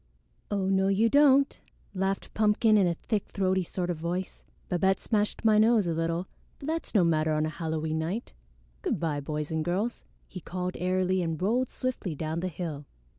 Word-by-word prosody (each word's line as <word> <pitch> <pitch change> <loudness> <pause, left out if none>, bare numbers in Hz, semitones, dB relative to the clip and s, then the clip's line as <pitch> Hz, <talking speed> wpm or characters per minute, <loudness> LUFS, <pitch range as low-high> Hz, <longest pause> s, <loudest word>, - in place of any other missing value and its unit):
"Oh, 200 -2 0
no, 190 0 +2
you 205 +4 +3
don't," 280 0 +4 0.3
laughed 195 0 -2
Pumpkin 215 +1 +3
in 195 -3 +4
a 170 - 0
thick 210 +3 -2
throaty 190 -1 +1
sort 180 0 -2
of 170 - -4
voice. 175 +3 -4 0.2
"Babette 190 +2 +2
smashed 210 0 -1
my 215 -1 +5
nose 220 -2 +4
a 170 - 0
little, 165 +2 -1 0.3
but - - -10
that's 320 -4 -3
no 195 - +6
matter 155 -2 +2
on 155 0 +1
a - - -1
Halloween 160 -1 -2
night. 180 +9 -3 0.5
Good - - -1
by, 155 -4 -1
boys 150 +1 -4
and 160 -1 0
girls," 195 +8 -2 0.2
he 185 - -8
called 180 +1 -4
airily 185 +1 +1
and 165 -2 -2
rolled 235 +7 +1
swiftly 245 -10 -3
down 160 +2 -3
the 185 - -2
hill. 155 -4 -5
185 Hz, 185 wpm, -28 LUFS, 165-210 Hz, 0.5 s, no